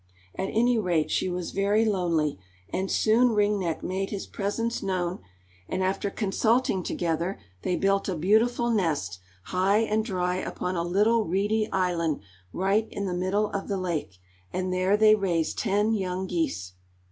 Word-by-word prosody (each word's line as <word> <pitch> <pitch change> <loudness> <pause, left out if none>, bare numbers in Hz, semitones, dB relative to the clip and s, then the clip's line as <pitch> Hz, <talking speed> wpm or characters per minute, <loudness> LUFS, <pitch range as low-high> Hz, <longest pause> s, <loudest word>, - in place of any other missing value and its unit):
At 190 - -3
any 240 +1 +3
rate 170 -6 0
she - - +1
was 180 -1 -3
very 205 +3 +2
lonely, 170 - 0 0.3
and 190 +1 -1
soon 230 +2 +3
Ring 210 -1 +2
Neck 170 -4 -2
made 190 +2 -2
his 200 -2 -4
presence 230 +4 -2
known, 185 -2 -2 0.5
and 190 - -1
after 195 +2 0
consulting 220 +1 +1
together, 170 +2 -2 0.2
they 180 - 0
built 195 +1 +1
a 185 - -1
beautiful 225 +8 +2
nest, 150 - 0 0.2
high 195 - +2
and 220 -1 +1
dry 180 -4 -1
upon 180 0 -3
a 170 - 0
little 210 +6 +2
reedy 210 +5 0
island 170 -5 0 0.3
right 200 - +1
in 200 - -4
the 185 - -2
middle 190 +4 0
of 195 - -3
the 200 - -1
lake, 165 - -3 0.3
and 185 0 -2
there 185 +3 +2
they 215 0 +6
raised 180 -6 0
ten 210 +1 +1
young 190 -2 -2
geese. 95 - -2
190 Hz, 160 wpm, -27 LUFS, 180-210 Hz, 0.5 s, they